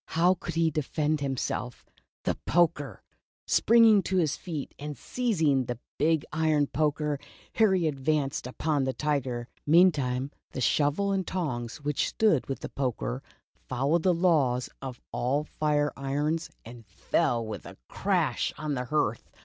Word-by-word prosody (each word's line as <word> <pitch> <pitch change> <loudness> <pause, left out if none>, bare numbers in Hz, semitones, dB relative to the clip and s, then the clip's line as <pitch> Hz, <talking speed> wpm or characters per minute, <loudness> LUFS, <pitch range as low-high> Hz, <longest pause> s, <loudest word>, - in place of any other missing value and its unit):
How 175 +3 +5
could 170 -2 -6
he 165 -1 +2
defend 155 +1 0
himself? 130 -2 -3 0.4
The - - +1
poker! 160 -5 +1 0.4
Springing 225 -3 +5
to 190 0 -1
his 160 -5 +2
feet 160 -6 -6
and 145 -1 -6
seizing 160 - +1
the 120 0 -4 0.2
big 160 0 +2
iron 155 -2 +2
poker, 150 0 0 0.3
Harry 190 -6 +3
advanced 140 -2 -1
upon 145 +2 -1
the 130 - -1
Tiger. 130 -4 -1 0.2
Meantime, 145 -6 +3 0.2
the - - -4
shovel 150 +10 +2
and 190 -2 -1
tongs, 130 -9 -3
which 145 -1 0
stood 205 - +2
with 135 - -3
the - - -5
poker 120 - -2 0.5
followed 140 - +1
the 185 - +3
law 160 -8 +3 0.2
of 130 -2 -6
all 135 +5 0
fire 150 -1 0
irons 150 +4 -1 0.2
and 115 0 -11
fell 115 +4 0
with 110 -1 -7
a - - -11
crash - - 0
on 155 -1 -3
the 125 -2 -2
hearth 120 -5 -1
150 Hz, 145 wpm, -28 LUFS, 130-165 Hz, 0.5 s, How